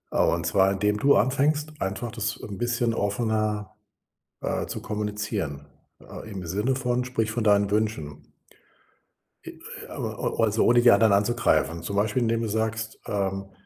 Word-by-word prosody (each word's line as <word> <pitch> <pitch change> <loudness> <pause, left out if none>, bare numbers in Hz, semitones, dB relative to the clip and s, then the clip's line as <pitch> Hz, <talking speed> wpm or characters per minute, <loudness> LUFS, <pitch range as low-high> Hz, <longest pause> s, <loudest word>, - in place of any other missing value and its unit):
Ah, - - +4
und 85 -1 0
zwar, 95 +3 +3
indem 105 +2 +1
du 140 +1 +5
anfängst, 150 +7 +1
einfach 95 +4 -3
das 115 -2 -3
'n 100 -3 -8
bisschen 120 -1 0
offener, 105 -1 -1 0.6
äh, - - -2
zu - - -5
kommunizieren, 105 -8 -3 0.4
äh, 110 - -10
im 95 -3 -6
Sinne 105 +9 0
von 125 -1 0
sprich 115 -3 -1
von 110 +1 -2
deinen 100 -1 +4
Wünschen. 105 -9 -2 1.1
I - - -6
e - - -12 0.4
o - - -3
oder 115 -2 +3
so 110 - +2
ohne 120 0 +5
die 120 0 +7
anderen 105 0 +5
anzugreifen. 100 -5 +1
Zum 100 +3 -4
Beispiel, 110 +4 +1
indem 115 0 +1
du 115 - -1
sagst, 110 +1 -2
ähm: 100 -2 -2
105 Hz, 165 wpm, -26 LUFS, 100-120 Hz, 1.1 s, die